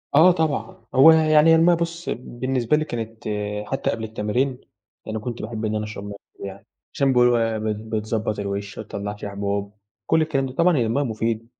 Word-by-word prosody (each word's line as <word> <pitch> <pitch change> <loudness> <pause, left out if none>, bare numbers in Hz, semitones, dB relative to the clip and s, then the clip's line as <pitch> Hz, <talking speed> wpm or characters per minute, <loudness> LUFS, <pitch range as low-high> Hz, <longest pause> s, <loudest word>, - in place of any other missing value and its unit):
آه 175 +5 +8
طبعًا. 140 - -2
هو 135 +5 +9
ي - - +7 0.2
يعني 155 +1 +6
هي - - +7
المَيّة 170 +2 +5
بُص 170 +1 -4
بالنسبة 125 +2 -1
لي 155 - -1
كانت 115 -3 -6 0.4
حتّى 135 - -1
قبل 110 0 -2
التمارين 115 +5 -1 0.4
يعني 110 0 -4
كنت 120 +2 -5
باحب 110 0 -4
إن 110 0 -1
أنا 105 - -1
أشرب 105 -2 -7
مَيّة 100 0 -6 0.2
كتير - - -8
يعني، 100 0 -9 0.3
عشان 135 -1 +2
بيقولوا 120 -1 +5
إيه، 115 -1 0
ب 110 - -5 0.3
بتضبّط 110 0 -2
الوِش 100 0 -4
ما 110 - -5
تطلَّعش 105 0 -6
حبوب 100 0 -3 0.3
كل 160 - +3
الكلام 140 -4 0
ده 130 - -5
طبعًا 170 -1 +3
هي 120 - +2
المَيّة 135 +6 +1
مفيدة. 115 -1 -2
115 Hz, 200 wpm, -23 LUFS, 105-140 Hz, 0.4 s, هو